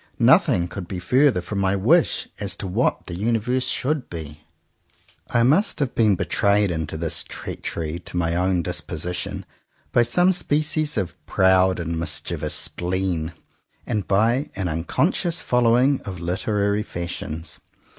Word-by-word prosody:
Nothing 130 - +4
could 90 0 -7
be 95 - -5
further 125 +3 +3
from 100 +3 -4
my 95 0 +2
wish 95 - +2
as 100 -2 -3
to 100 - -6
what 100 +7 0
the 90 - -7
universe 115 +6 0
should 145 0 -1
be. 75 -3 -8 0.9
I 120 - +2
must 155 - +3
have 135 -4 -1
been 110 -4 +3
betrayed 100 +2 +2
into 80 -1 -3
this 85 0 -1
treachery 80 0 -5
to 90 - -7
my 85 -1 +1
own 90 0 +1
disposition 85 +3 -4 0.5
by 120 - +4
some 175 +11 +3
species 155 -3 +1
of 90 -3 -4
proud 95 -1 +3
and 85 -1 -3
mischievous 85 - -1
spleen, 90 -2 -1 0.5
and 105 -3 -2
by 115 +8 +2
an 95 -3 -2
unconscious 160 - 0
following 125 +3 +3
of 95 -3 -7
literary 100 +4 0
fashions. 85 -4 -5
95 Hz, 140 wpm, -23 LUFS, 85-120 Hz, 0.9 s, Nothing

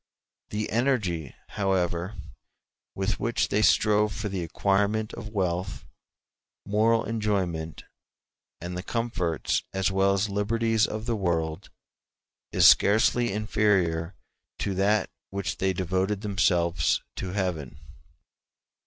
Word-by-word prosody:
The 105 +1 -3
energy, 105 - 0
however, 95 -1 -1 0.8
with 95 +2 -1
which 120 0 0
they 105 - +1
strove 105 -1 +3
for 105 - -4
the 95 -3 -3
acquirement 100 +5 0
of 110 - -7
wealth, 95 -2 -2 0.8
moral 110 +3 +2
enjoyment, 95 -8 -2 0.8
and 90 +1 -6
the 90 - -3
comforts 100 -7 -1
as 95 0 +1
well 95 0 +3
as 100 +2 0
liberties 110 +2 +1
of 110 +1 -5
the 120 -1 0
world, 85 -3 -2 0.8
is - - +6
scarcely 110 +3 +4
inferior 95 -5 +1 0.4
to 100 - -2
that 100 +3 +1 0.2
with 100 -1 -5
which - - -2
they 95 0 +1
devoted 95 +2 -1
themselves 90 -6 +1
to 95 -1 -4
Heaven. 85 -9 -3
100 Hz, 115 wpm, -26 LUFS, 90-105 Hz, 0.8 s, is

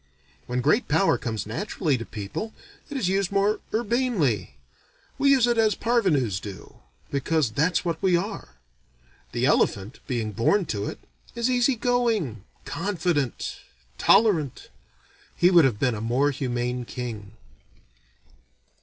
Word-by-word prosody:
When 125 +1 -1
great 180 - +2
power 195 - +3
comes 110 -5 -4
naturally 155 - -1
to 115 -2 -5
people, 105 - -6 0.3
it 285 - -4
is 235 - 0
used 195 0 0
more 200 +2 +2
urbanely. 215 - 0 0.6
We 280 - +4
use 265 -4 +5
it 240 -1 +1
as 215 -2 +3
parvenus 160 - +1
do, 100 -1 -10 0.3
because 140 -2 0
that's 160 +9 +1
what 165 -2 -2
we 185 -2 +3
are. 195 - -5 0.8
The - - 0
elephant, 100 +6 +1
being 115 -5 -2
born 145 - +2
to 100 -1 -3
it, - - -5 0.4
is 235 +2 0
easy 250 +1 +3
going, 225 - 0 0.2
confident, 170 - -2 0.4
tolerant. 170 - +3 0.7
He 175 +1 +5
would 170 -5 +7
have 120 -6 +1
been 125 +1 +1
a 105 - -5
more 125 +6 +1
humane 125 -2 -2
king. 115 -4 -7
160 Hz, 135 wpm, -25 LUFS, -, 0.8 s, would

